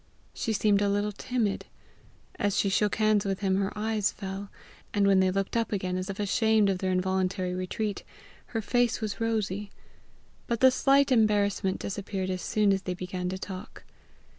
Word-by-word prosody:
She 230 Hz, -, -2 dB
seemed 205 Hz, -1 st, +3 dB
a 205 Hz, -, +2 dB
little 205 Hz, +1 st, 0 dB
timid. 220 Hz, -1 st, -2 dB, 0.7 s
As 205 Hz, -1 st, +1 dB
she 200 Hz, -, +2 dB
shook 205 Hz, +1 st, +1 dB
hands 215 Hz, -2 st, +3 dB
with 195 Hz, -1 st, -2 dB
him 190 Hz, -1 st, +2 dB
her 195 Hz, 0 st, 0 dB
eyes 215 Hz, -1 st, 0 dB
fell; 195 Hz, 0 st, -6 dB, 0.5 s
and 200 Hz, -1 st, +3 dB
when 195 Hz, -1 st, +5 dB
they 190 Hz, 0 st, +4 dB
looked 195 Hz, +3 st, -2 dB
up 230 Hz, -1 st, 0 dB
again, 185 Hz, -3 st, -1 dB
as 185 Hz, +1 st, -3 dB
if 195 Hz, -, -5 dB
ashamed 210 Hz, 0 st, +3 dB
of 185 Hz, -, -2 dB
their 185 Hz, 0 st, 0 dB
involuntary 185 Hz, 0 st, 0 dB
retreat, 195 Hz, +3 st, -3 dB, 0.4 s
her 225 Hz, -2 st, -3 dB
face 245 Hz, +1 st, +1 dB
was 215 Hz, -2 st, -4 dB
rosy; 210 Hz, -3 st, -1 dB, 0.8 s
but 235 Hz, -1 st, -1 dB
the 260 Hz, +1 st, +7 dB
slight 275 Hz, +1 st, +3 dB
embarrassment 205 Hz, -4 st, +2 dB
disappeared 195 Hz, -1 st, -4 dB
as 185 Hz, -1 st, -3 dB
soon 210 Hz, -2 st, +2 dB
as 195 Hz, -, -1 dB
they 185 Hz, -1 st, -3 dB
began 180 Hz, 0 st, -4 dB
to 185 Hz, -, -3 dB
talk. 185 Hz, -1 st, -8 dB
200 Hz, 180 wpm, -28 LUFS, 190-215 Hz, 0.8 s, the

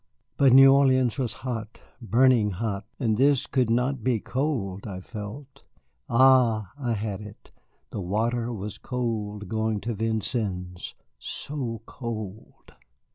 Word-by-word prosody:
But 135 Hz, -2 st, +5 dB
New 135 Hz, +1 st, +9 dB
Orleans 130 Hz, -3 st, +3 dB
was 125 Hz, -4 st, 0 dB
hot, 115 Hz, -3 st, -4 dB, 0.2 s
burning 120 Hz, -1 st, +4 dB
hot, 100 Hz, 0 st, -3 dB
and 110 Hz, -5 st, +1 dB
this 140 Hz, +1 st, +3 dB
could 125 Hz, -4 st, +1 dB
not 125 Hz, +1 st, 0 dB
be 120 Hz, -2 st, +1 dB
cold 115 Hz, -8 st, -2 dB
I 95 Hz, -3 st, -5 dB
felt. 120 Hz, +8 st, -9 dB, 0.5 s
Ah, 120 Hz, -5 st, +4 dB
I 120 Hz, -4 st, -1 dB
had 105 Hz, -2 st, -3 dB
it, 105 Hz, 0 st, -12 dB, 0.4 s
the 100 Hz, -, -4 dB
water 115 Hz, +6 st, -1 dB
was 105 Hz, -2 st, -6 dB
cold 110 Hz, -5 st, -3 dB
going 110 Hz, +1 st, -1 dB
to 115 Hz, +2 st, -3 dB
Vincennes, 105 Hz, -5 st, -3 dB, 0.2 s
so 120 Hz, -7 st, -4 dB
cold! 110 Hz, -5 st, -7 dB
115 Hz, 130 wpm, -26 LUFS, 105-130 Hz, 0.5 s, New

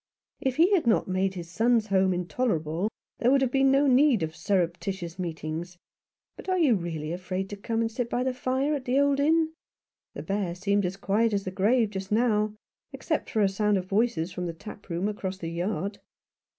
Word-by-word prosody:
" -, -, -47 dB
If 255 Hz, -, -5 dB
he 345 Hz, +7 st, +4 dB
had 340 Hz, -10 st, +2 dB
not 225 Hz, -, +3 dB
made 190 Hz, +1 st, 0 dB
his 175 Hz, -2 st, -6 dB
son's 225 Hz, +3 st, +2 dB
home 190 Hz, -1 st, +3 dB
intolerable 175 Hz, -1 st, -1 dB, 0.3 s
there 240 Hz, -, +3 dB
would 275 Hz, +1 st, +4 dB
have 255 Hz, -, 0 dB
been 270 Hz, 0 st, +4 dB
no 275 Hz, +2 st, +4 dB
need 265 Hz, -, +4 dB
of 160 Hz, 0 st, -4 dB
surreptitious 180 Hz, -1 st, -2 dB
meetings. 170 Hz, 0 st, -5 dB, 0.6 s
But -, -, -9 dB
are 370 Hz, -, +2 dB
you 305 Hz, -8 st, +4 dB
really 165 Hz, -5 st, -3 dB
afraid 185 Hz, +2 st, -4 dB
to -, -, -3 dB
come 225 Hz, +3 st, -2 dB
and 225 Hz, 0 st, -1 dB
sit 235 Hz, 0 st, -3 dB
by 245 Hz, +1 st, 0 dB
the 260 Hz, 0 st, 0 dB
fire 260 Hz, +3 st, 0 dB
at 275 Hz, -3 st, -3 dB
the 255 Hz, +2 st, +2 dB
old 285 Hz, 0 st, +3 dB
inn? 320 Hz, +2 st, +2 dB, 0.6 s
The -, -, -6 dB
Bear 195 Hz, -3 st, -2 dB
seemed 200 Hz, +1 st, +1 dB
as 185 Hz, +2 st, -5 dB
quiet 210 Hz, +3 st, +1 dB
as 200 Hz, -1 st, 0 dB
the 185 Hz, -, -4 dB
grave 215 Hz, +4 st, +2 dB
just 190 Hz, -1 st, -6 dB
now 215 Hz, -2 st, +2 dB, 0.2 s
— -, -, -62 dB
except -, -, -2 dB
for 220 Hz, -, 0 dB
a -, -, +5 dB
sound 205 Hz, +1 st, +1 dB
of 185 Hz, -, -3 dB
voices 200 Hz, -3 st, 0 dB
from 180 Hz, -1 st, -4 dB
the 170 Hz, -, -4 dB
tap 205 Hz, +4 st, -11 dB
room 175 Hz, +3 st, -1 dB
across 195 Hz, -3 st, -4 dB
the 165 Hz, -3 st, -5 dB
yard." 185 Hz, +3 st, -3 dB
200 Hz, 215 wpm, -27 LUFS, 180-245 Hz, 0.6 s, a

